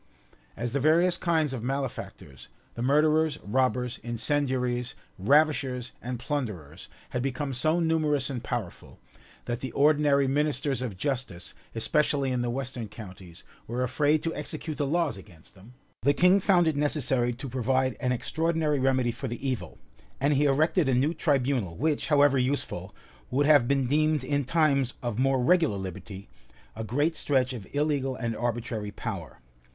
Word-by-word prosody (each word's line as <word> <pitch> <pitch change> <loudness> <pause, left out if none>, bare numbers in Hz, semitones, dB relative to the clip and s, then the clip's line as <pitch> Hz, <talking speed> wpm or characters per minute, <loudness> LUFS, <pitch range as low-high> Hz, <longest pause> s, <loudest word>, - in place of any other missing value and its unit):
As 120 0 -3
the 140 - +1
various 165 +5 +4
kinds 160 -5 0
of 125 - -4
malefactors, 130 - -5 0.3
the 115 - -6
murderers, 150 +3 +3
robbers, 125 +2 0
incendiaries, 125 +1 -1 0.2
ravishers, 135 +1 +2
and 125 +1 -4
plunderers, 105 - -5 0.2
had 125 - -1
become 135 +1 -2
so 155 +7 +2
numerous 155 -4 +1
and 130 -4 -4
powerful, 115 -8 -5 0.5
that 120 -1 -3
the 130 -2 -5
ordinary 145 -1 +3
ministers 140 -2 0
of 115 -7 -4
justice, 125 - -3 0.2
especially 140 +2 +1
in 125 -1 0
the 120 - -1
western 125 -2 -4
counties, 95 -5 -11 0.2
were 120 +2 -2
afraid 145 +4 +1
to 165 - -1
execute 150 +1 -4
the 145 - 0
laws 160 - 0
against 90 -5 -15
them, 105 +6 -17 0.3
the 140 - +3
king 180 +3 +5
found 180 -3 +3
it 160 - +1
necessary 135 -4 +1
to 130 +4 -7
provide 130 0 0
an 125 - 0
extraordinary 160 +3 0
remedy 130 -2 +2
for 135 +3 -6
the 120 +3 -4
evil; 130 -4 -3 0.4
and 140 +2 +2
he 145 +1 +3
erected 150 +2 +2
a 130 - +3
new 140 +6 +2
tribunal, 130 - 0
which, 150 +3 0
however 145 -3 +4
useful, 130 +3 -2 0.3
would 140 +3 +1
have 145 -5 +5
been 135 -1 +2
deemed 155 +1 +2
in 145 +1 -1
times 140 -4 +2
of 120 -2 -2
more 135 -1 +2
regular 160 - +3
liberty, 95 +1 -7 0.5
a 110 - -5
great 145 +9 0
stretch 130 -4 +1
of 110 -6 -8
illegal 145 -3 0
and 115 -3 -3
arbitrary 115 -3 -3
power. - - -6
135 Hz, 155 wpm, -27 LUFS, 120-150 Hz, 0.5 s, king